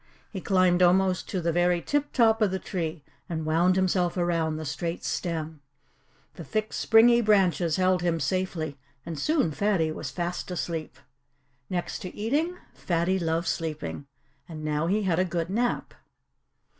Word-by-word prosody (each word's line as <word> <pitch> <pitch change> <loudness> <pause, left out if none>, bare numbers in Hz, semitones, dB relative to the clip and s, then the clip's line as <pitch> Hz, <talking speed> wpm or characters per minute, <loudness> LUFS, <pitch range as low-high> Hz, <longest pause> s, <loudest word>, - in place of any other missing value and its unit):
He 190 - -5
climbed 185 -2 +3
almost 185 +1 +3
to 185 - -2
the 170 0 0
very 175 +1 +2
tip 290 +9 -1
top 225 -3 +3
of 210 - +4
the 190 - -2
tree 165 -5 -4 0.3
and 160 -2 -3
wound 170 +4 +3
himself 185 -1 +1
around 165 -3 0
the 155 - -5
straight 165 +3 -4
stem. 160 -3 -3 0.7
The 170 - -9
thick, 215 +4 -2
springy 235 +2 +5
branches 185 -7 +3
held 185 -1 +2
him 170 -2 0
safely, 160 -2 -2 0.3
and 165 -3 -5
soon 285 - +1
Fatty 175 -2 +1
was - - -5
fast 175 +1 -4
asleep. 165 -3 -4 0.7
Next 175 -2 -3
to 185 - -8
eating, 300 +12 -1 0.2
Fatty 175 +2 0
loved 165 0 -1
sleeping. 155 -3 -3 0.4
And 155 -2 -7
now 150 +1 0
he 205 +4 +1
had 180 -3 +1
a - - +4
good 175 -1 -3
nap. 240 +4 -1
175 Hz, 155 wpm, -27 LUFS, 165-190 Hz, 0.7 s, springy